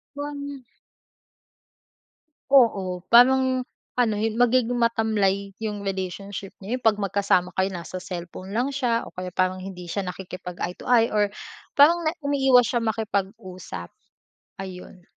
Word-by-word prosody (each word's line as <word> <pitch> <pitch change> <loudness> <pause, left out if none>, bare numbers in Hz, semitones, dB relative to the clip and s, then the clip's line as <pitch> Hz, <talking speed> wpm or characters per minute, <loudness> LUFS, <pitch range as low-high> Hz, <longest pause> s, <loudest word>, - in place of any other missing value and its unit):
Wan 285 -2 -6 1.9
Oo, 195 -9 +4
parang, 255 +1 +5 0.3
ano 240 -3 +2
hi 220 +1 0
magiging 245 +1 +3
matamlay 210 -4 +1
yung 205 -2 -4
relationship 195 +1 -4
niyo, 210 +6 -3
yun 255 - -11
'pag 220 -3 +3
magkasama 195 -3 +1
kayo 190 +1 +1
nasa 180 +1 -6
cellphone 180 +1 -7
lang 240 +5 +1
siya, 240 -4 0
o - - -12
kaya 185 -1 -5
parang 185 +1 0
hindi 185 -2 -8
siya 200 +4 -2
nakikipag-eye-to-eye 180 +5 -1
or 205 -1 +2 0.5
parang 335 +4 +6
na 315 - +3
umiiwas 270 -4 +4
siyang 230 -2 0
makipag-usap, 190 - -4 0.7
ayun. 185 -1 -10
205 Hz, 125 wpm, -24 LUFS, 185-245 Hz, 1.9 s, parang